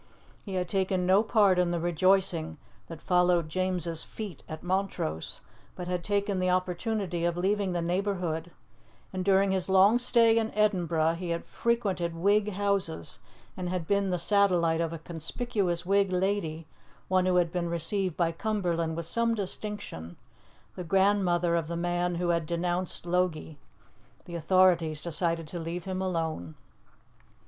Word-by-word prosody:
He 195 -3 -6
had 180 -1 -1
taken 190 -1 0
no 190 +3 +5
part 205 -4 +3
in 180 -1 +2
the 175 -1 -1
rejoicing 175 -1 +1 0.3
that 165 -2 -10
followed 180 -2 +2
James's 175 -2 -1
feat 205 -9 -8
at 155 0 -7
Montrose, 180 - -2 0.3
but 180 - -6
had 180 -1 -2
taken 200 -1 0
the 185 0 +1
opportunity 185 0 -1
of 170 0 0
leaving 195 +1 0
the 175 -1 -1
neighbourhood, 175 -2 -2 0.6
and 185 -1 -2
during 195 0 +3
his 190 -1 0
long 195 +5 +5
stay 230 -2 +4
in 225 0 -2
Edinburgh 170 -6 +2
he 180 -1 -4
had 170 0 -2
frequented 200 -8 -1
Whig 205 +4 +2
houses 195 - -1 0.4
and 180 -1 -4
had 180 -2 -2
been 200 +1 +1
the 180 - 0
satellite 175 -3 +2
of 165 -1 -1
a 165 - -5
conspicuous 175 +2 -3
Whig 195 0 +2
lady, 180 -4 -1 0.4
one 185 0 +2
who 185 - +2
had 175 -2 +2
been 170 -1 -2
received 170 +2 0
by 170 -2 +2
Cumberland 170 -4 -1
with 170 - -3
some 230 +6 +1
distinction, 200 - -5 0.6
the 180 - -5
grandmother 180 -2 +2
of 165 -2 -1
the 170 +1 -4
man 175 0 -1
who 175 0 -1
had 170 -2 0
denounced 175 +1 -2
Logie. 170 -4 -1 0.7
The 175 - -10
authorities 170 -3 +3
decided 165 -1 -1
to 175 - -5
leave 170 +1 -4
him 185 0 -3
alone. 160 - -3
180 Hz, 155 wpm, -28 LUFS, 170-195 Hz, 0.7 s, no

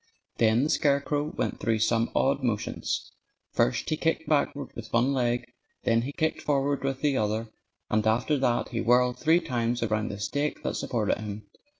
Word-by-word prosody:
Then 115 +2 +4
the 150 - 0
scarecrow 145 0 +1
went 155 - -3
through 115 -2 +1
some 115 +1 +2
odd 140 +1 +2
motions. 115 -5 -2 0.4
First - - +1
he - - +3
kicked 160 0 0
backward 145 -1 0
with 115 -1 -8
one 125 +4 +3
leg; 120 -2 0 0.4
then 115 0 +3
he 130 +4 -4
kicked 160 +1 -1
forward 140 -1 0
with 135 -1 -2
the 145 -3 +2
other; 110 +1 -1 0.4
and 110 0 +1
after 115 +7 +2
that 120 -2 +1
he 115 -2 -2
whirled 125 +1 +3
three 160 +2 +4
times 120 -5 -1
around 110 -1 0
the 100 - -6
stake 145 +8 -2
that - - -2
supported 110 -5 -1
him. 105 0 -6
125 Hz, 180 wpm, -27 LUFS, 115-140 Hz, 0.4 s, Then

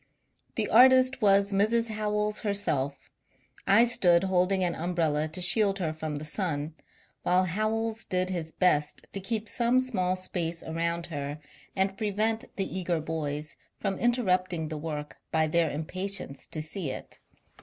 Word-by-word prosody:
The - - 0
artist 255 +2 +6
was 200 -1 +4
Mrs. 225 +4 +2
Howells 210 -1 -1
herself; 145 - -1 0.6
I 215 +5 +6
stood 190 -8 +4
holding 190 0 +2
an 175 -1 +1
umbrella 160 -3 0
to 165 +4 -2
shield 195 +2 +3
her 165 -5 -2
from 155 -1 -5
the 145 +1 -5
sun, 150 -2 -2 0.5
while 180 +1 +3
Howells 220 +4 -1
did 185 0 -1
his 165 -3 -3
best 150 -5 +1
to 195 - -4
keep 215 +3 -3
some 240 +3 +2
small 185 -8 0
space 170 -3 -3
around 170 +1 -2
her 145 +1 -4 0.4
and 195 0 0
prevent 215 +1 0
the 190 -1 -2
eager 175 -2 0
boys 150 -1 -4 0.2
from 195 -2 -2
interrupting 185 -9 +1
the 155 - -4
work 150 -1 -5
by 160 -1 +2
their 165 +1 +2
impatience 175 -1 -3
to 155 - -5
see 155 0 -3
it. - - -8
185 Hz, 150 wpm, -28 LUFS, 160-210 Hz, 0.6 s, artist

